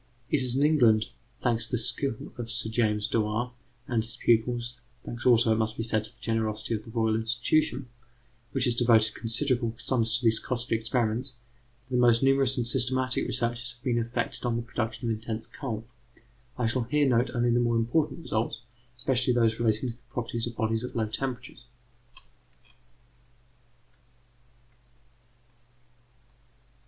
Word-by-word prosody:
ED] - - -13
It - - 0
is 125 -1 +1
in 140 +2 +3
England, 120 -8 +4 0.4
thanks 115 -2 +1
to - - -12
the - - +3
skill 125 0 -1
of 115 -1 -4
Sir 115 -1 0
James 105 -3 +1
Dewar 110 +2 0 0.4
and 120 -3 +1
his 115 - -5
pupils 120 +1 +1 0.3
thanks 120 +2 -4
also, 120 -2 +5
it 110 - 0
must 110 0 -1
be 115 - -2
said, 110 -2 +1
to - - -7
the - - -26
generosity 110 -1 -1
of 110 -1 -2
the 115 - -11
Royal 110 -1 +1
Institution, 120 +4 +1 0.6
which 135 -2 +1
has 120 - +2
devoted 115 -2 +4
considerable 120 0 0
sums 115 -3 +1
to 120 - -3
these 110 -1 +4
costly 120 -2 -1
experiments 115 +3 0 0.5
that 130 - -10
the 125 - +3
most 120 0 +5
numerous 135 -1 +3
and 120 - 0
systematic 130 +1 +1
researches 120 0 -2
have 125 0 -24
been 120 -3 +1
effected 115 +1 -3
on 120 -2 0
the 115 - -2
production 115 0 -3
of - - 0
intense 110 0 -5
cold. 115 -6 -5 0.7
I 125 - 0
shall 115 +3 +1
here 145 +5 +2
note 125 -1 +2
only 120 0 +2
the 120 - +3
more 120 -1 +2
important 145 +8 0
results, 110 -6 -2 0.4
especially 125 0 +1
those 115 -2 +2
relating 115 +1 +1
to - - -12
the - - -30
properties 115 -1 -3
of 120 - -7
bodies 110 0 0
at 125 - -6
low 115 -2 +1
temperatures. 120 +3 -5
120 Hz, 165 wpm, -28 LUFS, 115-125 Hz, 0.7 s, also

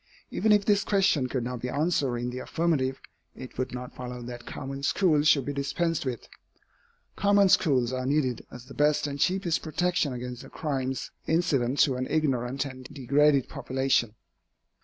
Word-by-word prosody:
Even 220 - +1
if 205 -1 +4
this 205 -1 +3
question 195 -11 +2
could 125 -1 -2
not 125 0 -4
be 125 - -3
answered 145 -4 0
in 120 +1 -3
the 125 - -5
affirmative, 140 -5 0 0.4
it 130 - -10
would 130 - -1
not 125 0 -7
follow 125 -1 -7
that 120 0 -8
common 135 0 -6
schools 150 -1 +2
should 140 -4 +4
be 145 - -3
dispensed 145 +2 -1
with. 125 -3 -4 0.9
Common 200 -1 +4
schools 135 -10 +3
are 130 0 -2
needed 135 -4 0
as 125 -1 -11
the 135 - -12
best 150 0 +2
and 140 -1 -4
cheapest 180 0 +1
protection 175 -1 0
against 125 0 -6
the - - -12
crimes 135 -4 -3 0.2
incident 140 -6 +1
to 130 -3 +3
an 130 0 -2
ignorant 135 -3 0
and 130 -2 -9
degraded 140 0 +3
population. 130 -4 0
140 Hz, 170 wpm, -27 LUFS, 125-155 Hz, 0.9 s, if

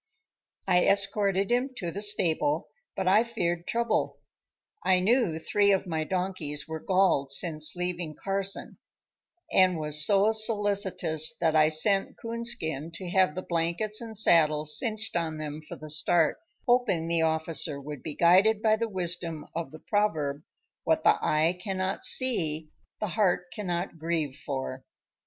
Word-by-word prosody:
I 180 -1 +3
escorted 200 0 +1
him 255 +2 0
to 170 -2 -4
the 200 - -6
stable, 210 - +1 0.3
but 190 - -3
I 205 +4 +5
feared 175 -8 -3
trouble. 235 0 -1 0.7
I 185 -1 +3
knew 205 -3 +1
three 200 +5 +1
of 195 0 +1
my 160 -3 -3
donkeys 180 -5 -3
were 160 0 -5
galled 185 -6 +1
since 155 +3 +2
leaving 175 -3 -4
Carson, 195 0 +1 0.7
and 185 -2 +3
was 150 -1 +1
so 200 +5 +3
solicitous 205 -7 +2
that 160 -2 0
I 155 0 +5
sent 195 +5 +3
Coonskin 230 - -3
to 180 -1 -6
have 185 -4 +2
the 185 - -5
blankets 170 +6 -2
and 225 -2 -7
saddles 155 -6 +4
cinched 220 -4 -3
on 165 -2 -2
them 155 0 -6
for 155 - -10
the 155 0 -10
start, 160 - +1 0.3
hoping 240 -10 +1
the 165 -1 +1
officer 160 -2 -1
would 145 -1 -8
be 155 -3 -6
guided 190 +6 +4
by 220 -1 +3
the 230 0 -3
wisdom 175 -4 -3
of 165 0 -4
the 155 - -11
proverb, 155 -9 -1 0.4
"What - - 0
the - - +4
eye 160 +4 +1
cannot 190 -1 -3
see 160 - 0 0.3
the 210 - -3
heart 180 -3 0
cannot 175 -4 -4
grieve 160 -4 -2
for." 135 -3 -6
180 Hz, 150 wpm, -27 LUFS, 155-205 Hz, 0.7 s, I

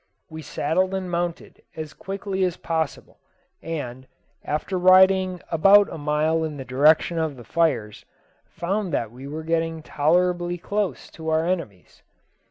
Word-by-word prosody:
We 160 0 -7
saddled 165 +6 -1
and 185 -2 -4
mounted 170 0 -3
as 155 -2 -6
quickly 195 0 -4
as 180 -1 0
possible, 160 -3 -3 0.4
and, 130 -6 -6 0.4
after 155 +6 -3
riding 185 0 +5
about 195 +5 +5
a - - -6
mile 155 +2 +1
in 155 -2 -4
the 135 - -7
direction 150 +6 +3
of 155 -4 -2
the 120 - -10
fires, 115 -7 -1 0.4
found 190 +3 -3
that 115 -5 -1
we 130 +3 -10
were 155 +2 -6
getting 165 0 -1
tolerably 175 +4 +1
close 200 +2 -3
to 160 -1 -6
our 160 +1 +2
enemies. 165 - -4
165 Hz, 145 wpm, -24 LUFS, 150-180 Hz, 0.4 s, riding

